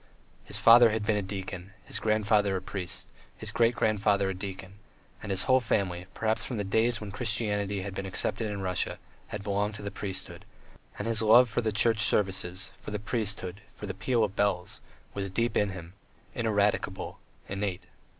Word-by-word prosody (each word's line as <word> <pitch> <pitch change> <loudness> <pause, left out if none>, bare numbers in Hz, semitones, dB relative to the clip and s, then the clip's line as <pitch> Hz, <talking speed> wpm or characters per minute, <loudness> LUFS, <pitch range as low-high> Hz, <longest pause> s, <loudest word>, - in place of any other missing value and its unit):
His 100 - -5
father 115 +2 +8
had 110 -1 -1
been 110 - +2
a 105 - +1
deacon, 95 -1 -6
his - - -1
grandfather 105 -2 +2
a - - -4
priest, 95 -3 -4 0.3
his - - -3
great 115 +1 +3
grandfather 100 -2 +2
a - - -2
deacon, 95 0 -7 0.4
and - - -7
his 95 -1 +1
whole 130 0 +5
family, 95 -7 -1
perhaps 110 0 0
from 125 - -4
the 105 - -1
days 115 +4 +1
when 105 -2 -7
Christianity 105 -4 -1
had 100 -1 -5
been 95 0 -4
accepted 110 +3 -2
in 100 -1 -4
Russia, 90 -1 0 0.3
had 105 - -6
belonged 105 +1 -1
to 105 - -8
the 100 - -4
priesthood; 95 -1 -5 0.5
and 105 - -3
his 115 -1 +1
love 120 +3 +7
for 115 - 0
the 110 -2 0
Church 110 +2 +2
services, 95 -2 +1
for - - -8
the 105 - -2
priesthood, 105 -3 -3
for - - -7
the 95 - -4
peal 115 +4 +1
of 105 - 0
the - - -23
bells, 90 -3 -1 0.3
was 100 -1 -3
deep 115 +4 0
in 105 - +2
him, 90 -2 -8 0.4
ineradicable, 105 -4 0 0.3
innate. 100 -2 -3
105 Hz, 190 wpm, -29 LUFS, 95-110 Hz, 0.5 s, father